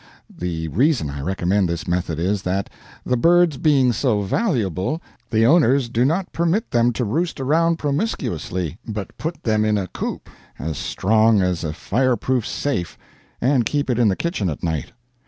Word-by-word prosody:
The 85 -2 -3
reason 115 - +1
I 70 0 -6
recommend 95 +3 0
this 85 -1 -3
method 90 -2 -1
is 95 +4 0
that, 95 +1 -2 0.3
the 125 - +1
birds 170 +2 +4
being 135 -5 +3
so 115 -4 +1
valuable, 110 - -1 0.3
the 110 0 +3
owners 140 -4 +4
do 120 +1 +1
not 175 +6 0
permit 170 +7 0
them 120 0 +3
to 125 - -1
roost 160 - -1
around 165 +5 +2
promiscuously, 115 - -2
but 105 -3 -5
put 165 +2 -4
them 110 -2 +2
in 105 -1 +2
a 100 - -1
coop - - -5 0.3
as 80 +1 -4
strong 110 0 +3
as 90 -2 -1
a 80 - -2
fireproof 125 +6 0
safe 135 -12 -2 0.4
and 130 -1 +2
keep 145 -3 -1
it 120 - 0
in 120 - +4
the 95 - +2
kitchen 140 - -1
at 75 - -6
night. 80 -5 -2
115 Hz, 170 wpm, -21 LUFS, 90-145 Hz, 0.4 s, birds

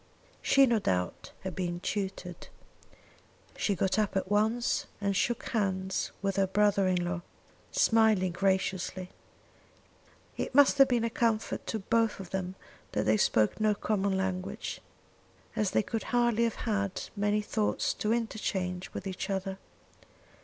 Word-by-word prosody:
She, 275 0 +5
no 235 -3 +2
doubt, 90 - -2
had 190 -3 -5
been 175 -2 -2
tutored. 190 -2 -4 1.1
She 200 - 0
got 190 +3 +1
up 210 -2 +1
at 190 +1 -2
once 220 +3 +1
and 200 -1 0
shook 240 +5 0
hands 190 -4 -1
with 195 -1 0
her 195 -1 +3
brother 200 0 +3
in 180 -1 +1
law, 175 0 -2 0.5
smiling 220 -5 +3
graciously. 190 0 -1 1.3
It - - -3
must 285 0 +6
have 275 - +8
been 240 -2 +1
a 230 - -1
comfort 225 -2 0
to 225 - -1
both 225 +1 +1
of 190 -3 -8
them 190 -1 -3 0.4
that - - 0
they 110 +1 +4
spoke 110 - +2
no 215 -1 +3
common 200 -2 0
language, 190 -1 -3 0.7
as 210 -3 +1
they - - +2
could 225 +2 -3
hardly 240 -2 +2
have 230 - -1
had 200 -4 -1
many 205 +1 +1
thoughts 210 0 0
to 215 - -1
interchange 195 -5 -2
with - - -5
each 190 +1 -4
other. 190 0 -2
200 Hz, 145 wpm, -30 LUFS, 185-220 Hz, 1.3 s, have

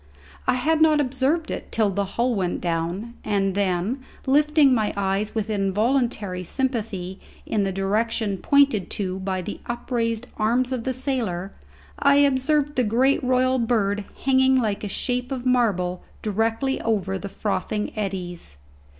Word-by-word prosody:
I - - +3
had 310 +5 +1
not 310 -1 +5
observed 280 +4 0
it - - -6
till 215 -3 +2
the 200 +1 -1
hull 245 +1 +2
went 185 -5 -1
down, 175 +7 -2
and 195 -2 0
then, 195 +5 0 0.3
lifting 295 0 +4
my 220 -4 +1
eyes 200 +3 -1
with 220 -1 -1
involuntary 210 -1 0
sympathy 205 -6 -3 0.3
in 205 -3 0
the 195 - -1
direction 205 +1 0
pointed 280 -9 +3
to 190 -2 -3
by 190 -1 -2
the - - -6
upraised 235 -1 -2
arms 240 +4 +1
of 250 -3 -3
the 260 - 0
sailor, 230 -9 -2 0.5
I 280 0 +5
observed 285 +1 +2
the 250 - +4
great 250 +6 +2
royal 255 0 +2
bird 210 -3 +1 0.2
hanging 265 -1 +4
like 215 -4 -1
a - - -2
shape 250 +5 -2
of 260 -2 -4
marble 200 -8 +1 0.2
directly 225 +5 0
over 195 -4 -1
the 200 - -6
frothing 210 +1 -2
eddies. 180 - -5
225 Hz, 150 wpm, -24 LUFS, 195-260 Hz, 0.5 s, not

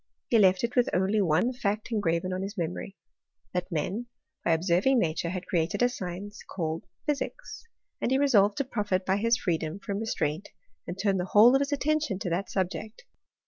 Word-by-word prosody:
He 230 - +5
left 190 -1 +4
it 235 +1 -1
with 245 -2 +3
only 195 +3 +2
one 180 +8 +2
&ct 210 +3 -1
engraven 185 -4 0
on 185 - -2
his 200 +2 -5
memory 180 +3 -4 0.3
— - - -29
^that 180 0 -1
men, 190 +9 -2 0.4
by 170 - +2
ob* 160 - +1
lerving 185 +9 +3
nature, 170 -4 0
had 180 +1 -4
created 165 +5 0
a 245 - +4
science 200 -1 -6
called 160 -3 -4 0.2
physics; 435 - -4 0.4
and - - +1
he 265 - +3
resolved 210 -8 +4
to 280 - +1
profit 205 -7 -1
by 190 +1 +2
his 230 +2 +2
freedom 165 -1 -2
from 200 0 -4
restraint 175 -6 -2 0.4
and 175 - -5
turn 195 0 +1
the 180 - -1
whole 215 +6 +7
of 270 - +3
his 280 +1 -1
attention 300 -5 0
to 180 -2 -4
that 185 +4 -1
subject. 205 - -3
195 Hz, 195 wpm, -28 LUFS, 180-230 Hz, 0.4 s, whole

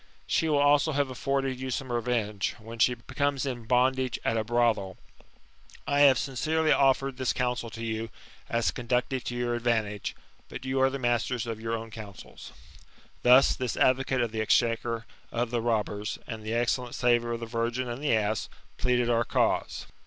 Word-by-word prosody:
She 160 - +1
will 150 - +3
also 145 +2 +4
have 140 -1 0
afforded 135 0 -1
you 130 0 -4
some 130 0 -3
revenge, 115 -4 -1
when 115 +1 -10
she 125 +2 +4
becomes 140 +3 -2
in 120 -4 -4
bondage 130 +1 +2
at 115 - +1
a 110 - +1
brothel. 115 -5 +1 0.9
I 145 0 +1
have 140 -3 +7
sincerely 155 +5 0
offered 135 -1 +3
this 130 -2 0
counsel 125 -2 -1
to 115 +1 -6
you, 110 0 -3 0.4
as 115 0 +1
conducive 125 +2 -1
to 120 - -3
your 120 0 -1
advantage; 110 -4 -1 0.3
but - - -8
you 130 0 0
are 135 - +5
the 135 - -4
masters 120 -1 0
of 115 -2 -5
your 115 0 -2
own 115 0 -8
counsels." 105 -3 -10 0.7
Thus 125 +2 +6
this 125 -3 -3
advocate 130 0 +2
of 120 -2 -1
the 110 0 -2
exchequer 115 0 +1 0.3
of 120 0 -1
the 120 -1 0
robbers, 105 -2 -1
and 110 -1 -6
the 110 +2 -3
excellent 120 +1 0
saviour 120 -1 +2
of 115 - -3
the 115 - -5
virgin 115 +2 -2
and 120 +4 -5
the 140 -6 +3
ass, 110 0 -1 0.3
pleaded 125 -1 +2
our 120 -1 +2
cause. - - 0
120 Hz, 180 wpm, -28 LUFS, 115-130 Hz, 0.9 s, have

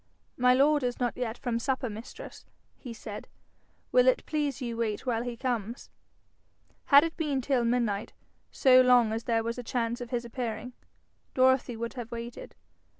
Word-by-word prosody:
'My 250 0 +4
lord 290 +2 +4
is 245 -1 -2
not 245 -2 -1
yet 245 -2 -3
from 240 -3 -2
supper, 260 +1 -1
mistress,' 220 +1 -10 0.3
he 250 - -8
said. 220 -2 -8 0.6
'Will 250 0 +5
it 255 - +3
please 295 -4 -2
you 240 -3 -4
wait 220 -1 -2
while 235 -3 0
he 240 -1 -5
comes?' 235 -2 -4 0.9
Had 285 0 +7
it 330 -1 -3
been 295 -5 -1
till 260 -1 +1
midnight, 230 -4 0 0.4
so 255 -2 +6
long 245 -3 +4
as 225 +1 -4
there 225 -1 +1
was 230 +2 -3
a - - -5
chance 235 +1 -2
of 240 - -6
his 240 -1 -2
appearing, 235 0 -5 0.6
Dorothy 260 -2 +3
would 230 +1 -4
have 240 -3 -7
waited. 235 0 -8
245 Hz, 170 wpm, -28 LUFS, 230-255 Hz, 0.9 s, Had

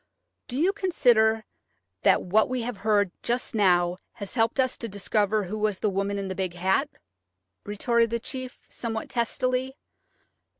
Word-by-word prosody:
"Do 250 - -5
you 355 +7 +3
consider 235 - +3 0.6
that - - +4
what 215 +6 +3
we 255 -2 -2
have 240 -2 -4
heard 205 -3 +2
just 240 +1 -1
now 180 -4 +3 0.2
has 200 -4 -6
helped 230 +1 +1
us 260 -1 +2
to 230 - -5
discover 205 +1 +1
who 205 +4 -5
was 210 -2 +1
the 210 - 0
woman 200 +1 -1
in 200 -1 -3
the 190 - -3
big 185 -2 -3
hat?" 190 +11 +1 0.8
retorted 230 +3 +1
the 235 +1 -1
chief, 255 +2 -6
somewhat 225 -2 -4
testily. 255 +3 -1
220 Hz, 160 wpm, -26 LUFS, 200-245 Hz, 0.8 s, that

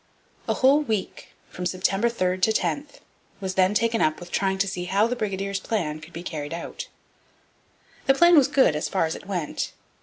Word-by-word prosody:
A - - +2
whole 275 +3 +4
week, 220 -9 -4 0.2
from 180 0 -3
September 195 +5 +1
3 185 -5 -1
to 220 - +3
10, 285 +6 -1 0.5
was 190 -1 -3
then 190 +2 +3
taken 230 +1 +1
up 155 0 +1
with 175 -1 -11
trying 190 -1 0
to 195 +1 +1
see 180 -2 -4
how 195 +4 +2
the 240 +2 -1
brigadiers' 200 -3 -2
plan 170 -8 -2
could 160 +2 -12
be 170 +1 -7
carried 155 -2 -5
out. 170 - -7 1.2
This 270 0 +4
plan 345 +2 +7
was 285 -4 +6
good, 260 - +3
as 150 - -2
far 185 -4 +1
as 160 - -2
it - - -10
went. 175 -6 -3
195 Hz, 195 wpm, -25 LUFS, 180-225 Hz, 1.2 s, plan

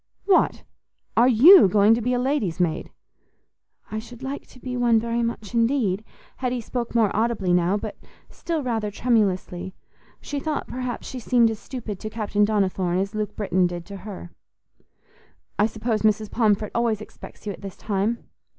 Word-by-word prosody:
"What! 390 -2 +3 0.5
are 240 +2 +5
you 265 - +8
going 205 +3 +5
to 235 - 0
be 250 +2 0
a - - 0
lady's 250 - -1
maid?" 170 -3 0 1.0
"I 215 - -2
should 240 +2 -11
like 275 +2 -5
to 255 - -17
be 250 0 -5
one 240 -2 +3
very 235 +1 -1
much 230 -2 -4
indeed." 230 -4 +1 0.3
Hetty 250 -1 -1
spoke 240 +1 -4
more 220 -4 +3
audibly 215 -5 +1
now, 180 +3 +2
but - - -6 0.3
still 325 -3 -4
rather 225 -4 -1
tremulously; 190 -5 0 0.4
she 290 - -4
thought, 305 +1 -2
perhaps 250 -1 -5
she 260 - -6
seemed 235 -1 +3
as 220 - -6
stupid 230 -6 -6
to 215 - -5
Captain 210 -2 0
Donnithorne 190 -4 +1
as 195 +2 -1
Luke 215 -1 -3
Britton 185 -3 +1
did 175 -1 -6
to 200 +1 -8
her. 185 -3 -9 1.3
"I 210 - +5
suppose 220 0 -2
Mrs. 215 -1 +1
Pomfret 215 -3 +1
always 235 -3 +1
expects 215 - -12
you 205 - -3
at - - -13
this 195 -2 -8
time?" 210 +3 -1
220 Hz, 170 wpm, -24 LUFS, 200-245 Hz, 1.3 s, you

